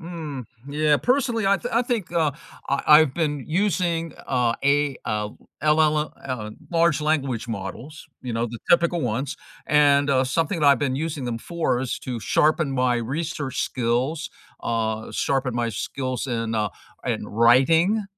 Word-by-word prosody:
mm, 160 -6 -6 0.2
yeah, 150 +1 +2
personally, 245 -5 +1
I 200 - +4
thin 245 - -5
I 235 +2 +3
think, 235 -8 -2
uh, 160 -4 +2 0.4
I 140 - 0
I've 150 -3 +7
been 150 -5 -1
using 170 -2 0 0.2
a 125 -3 +2
a, 145 -1 +2
uh, 105 -1 -2 0.3
LLL 150 0 +2
uh, 120 -5 -4 0.2
large 170 -2 +3
language 140 -7 -1
models, 115 +8 -7
you 125 - -5
know, 115 +1 0
the 120 0 -7
typical 170 0 +4
ones, 125 +2 -2 0.3
and, 145 -1 +4
uh, 130 -1 +3
something 165 +6 -1
that 150 - +3
I've 140 -2 +6
been 130 -3 -1
using 150 -2 -3
them 120 -2 -3
for 165 -3 -1
is 130 -2 -3
to 125 -3 -5
sharpen 155 +4 +2
my 125 -2 +2
research 145 +3 -3
skills 130 +6 -1 0.3
uh, 110 -1 -2
sharpen 130 -2 -1
my 120 -1 0
skills 130 +3 -3
in, 115 -2 -2
uh 105 -1 +1 0.4
in - - -2
writing 160 - +4
140 Hz, 160 wpm, -24 LUFS, 125-165 Hz, 0.4 s, I've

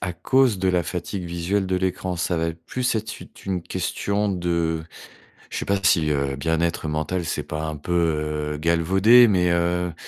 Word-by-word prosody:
à 90 -2 -3
cause 125 +4 +2
de 95 0 +1
la 90 -1 +2
fatigue 90 +2 -4
visuelle 85 +3 -1
de 95 0 0
l'écran. 95 0 -2
Ça 85 +1 -1
va 80 0 0
être 80 0 -8
plus 125 -1 -1
être 110 0 -4
une - - -11 0.2
une 90 -3 -2
question 100 +3 -2
de 85 -3 -1 0.7
je - - -5
sais - - -4
pas 100 0 +1
si, 85 -5 +3
heu, 70 -1 -1
bien 80 +4 -1
être 85 -1 -1
mental, 80 +4 -2
c'est 80 - -3
pas 75 0 -5
un 80 -1 -4
peu, 85 +4 -4 0.6
heu, - - -5
galvaudé. 95 +9 +5
Mais, 90 -3 +2
heu, 85 0 0
90 Hz, 195 wpm, -23 LUFS, 80-95 Hz, 0.7 s, galvaudé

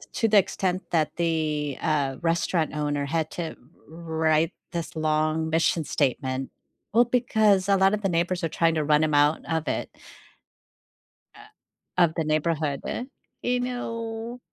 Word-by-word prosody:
t - - -13
to 225 - +3
the 210 - +6
extent 185 -1 0
that 160 -3 0
the, 155 -4 -1
uh, 145 -4 0
restaurant 165 -1 0
owner 145 -1 -1
had 160 +1 -1
to 170 -2 -5 0.3
wr 160 0 -7
write 160 +1 +3 0.2
this 170 -1 -4
long 155 0 0
mission 165 +1 +2
statement. 130 -1 -1 0.4
Well, 235 +3 +6
because 215 -6 +2
a 200 - +5
lot 195 +1 +4
of 210 - -3
the 195 - +1
neighbors 175 +1 0
are - - +1
trying 165 0 +2
to 155 -2 0
run 150 +1 +3
him 155 -1 0
out 145 +2 +3
of 160 -1 -1
it - - -2 1.5
uh, - - -15 0.6
of 170 -3 +4
the 165 - 0
neighborhood. 155 -2 0 0.6
You 245 0 0
know? 230 -1 -4
165 Hz, 155 wpm, -25 LUFS, 155-190 Hz, 1.5 s, the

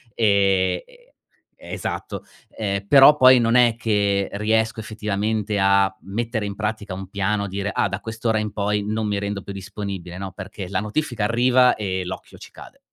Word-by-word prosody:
ehm 100 -4 +2 0.8
e - - -8
esatto, - - -5 0.3
ehm, 100 -2 -2
però 140 +3 +8
poi, 130 -2 +7
non 115 0 +2
è 120 -2 +5
che 100 -3 0
riesco 110 +2 0
effettivamente 105 -1 -2
a 95 0 +3
mettere 110 +1 -3
in 100 - -6
pratica 105 -3 -4
un 95 0 -7
piano, 100 +1 -1
dire: 100 +1 -3
"Ah, - - +1
da 95 +1 -4
quest'ora 110 0 -2
in 105 -1 -3
poi 105 0 -1
non 110 +1 -2
mi 105 -1 -1
rendo 100 -1 -4
più 100 - -7
disponibile". 95 -2 -7
No, 95 -1 -6
perché, 95 0 -8
la 95 -1 -1
notifica 110 0 -2
arriva 125 +2 +4
e 95 -3 -3
l'occhio 90 - -8
ci - - -12
cade. - - -14
105 Hz, 170 wpm, -22 LUFS, 100-110 Hz, 0.8 s, però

